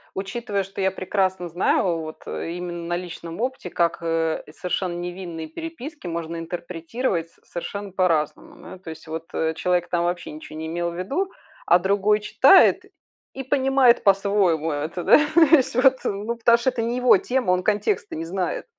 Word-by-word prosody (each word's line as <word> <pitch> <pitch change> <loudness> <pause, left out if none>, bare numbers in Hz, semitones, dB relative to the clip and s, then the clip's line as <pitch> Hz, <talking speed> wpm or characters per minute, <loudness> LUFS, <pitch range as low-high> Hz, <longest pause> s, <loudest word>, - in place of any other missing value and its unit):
учитывая, 200 +1 -3
что 195 +1 -10
я 190 0 +2
прекрасно 185 -1 -1
знаю, 175 0 +1
вот 155 0 -8
именно 175 0 -5
на 175 - -1
личном 170 +1 -7
опыте, 255 -7 -3
как, 170 -1 +1
э, 165 -1 -1
совершенно 180 +2 -3
невинные 175 -2 -6
переписки 300 - -8
можно 170 0 -4
интерпретировать 170 +2 -3
с - - -29
совершенно 200 +3 -6
по-разному, 170 -5 0
да. - - -10
То 175 -3 -9
есть 160 +1 -12
вот, 160 +1 -5
э, 160 0 0
человек 175 +1 0
там 175 -1 0
вообще 175 -2 -3
ничего 155 0 -10
не 160 0 -5
имел 170 +1 -2
в - - -9
виду, 285 - -2 0.3
а 175 - +5
другой 200 +3 +2
читает 210 - +5 0.5
и 270 - -5
понимает 265 -2 +3
по-своему 195 -5 +2
это, 155 +4 -3
да - - +7 0.2
о - - +7 0.2
есть 260 -4 +1
вот. 260 +1 +5
Ну 210 +4 -2
потому 235 0 +5
что 235 +2 +1
это 245 -2 -3
не 235 +2 -1
его 250 -5 +6
тема, 245 -1 0
он 180 0 +2
контекста 405 - 0
не 165 - -4
знает. 180 +2 -3
180 Hz, 175 wpm, -23 LUFS, 170-215 Hz, 0.5 s, да